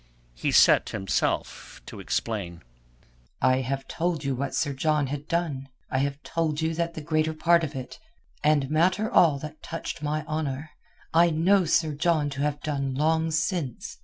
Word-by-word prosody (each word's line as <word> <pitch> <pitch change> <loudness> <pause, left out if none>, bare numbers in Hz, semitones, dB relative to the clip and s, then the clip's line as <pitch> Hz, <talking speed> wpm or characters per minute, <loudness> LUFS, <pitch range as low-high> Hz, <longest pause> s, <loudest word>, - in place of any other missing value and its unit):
He - - -2
set - - +5
himself 95 -1 -2
to - - -9
explain. 95 - -3 0.8
"I 130 0 +3
have 135 +1 -3
told 165 -3 -2
you 135 -1 0
what 135 +1 -3
Sir 145 - 0
John 150 +1 +1
had 145 +2 -5
done. 150 -6 -2 0.2
I 130 - +1
have 140 +1 -1
told 160 -2 -1
you 160 0 0
that 170 +1 -2
the 155 - -5
greater 155 +1 0
part 170 +1 +3
of 150 -2 -4
it—and 135 +2 -3
matter 185 +7 +2
all 155 -5 +5
that 155 +2 -9
touched 165 -2 -6
my 150 +1 -2
honour—I 155 +2 -1
know 180 +4 +3
Sir 160 -1 +2
John 150 -1 +1
to 135 0 -4
have 145 0 -1
done 140 -3 -2
long 160 +3 +1
since. 160 - -2
150 Hz, 160 wpm, -26 LUFS, 135-160 Hz, 0.8 s, set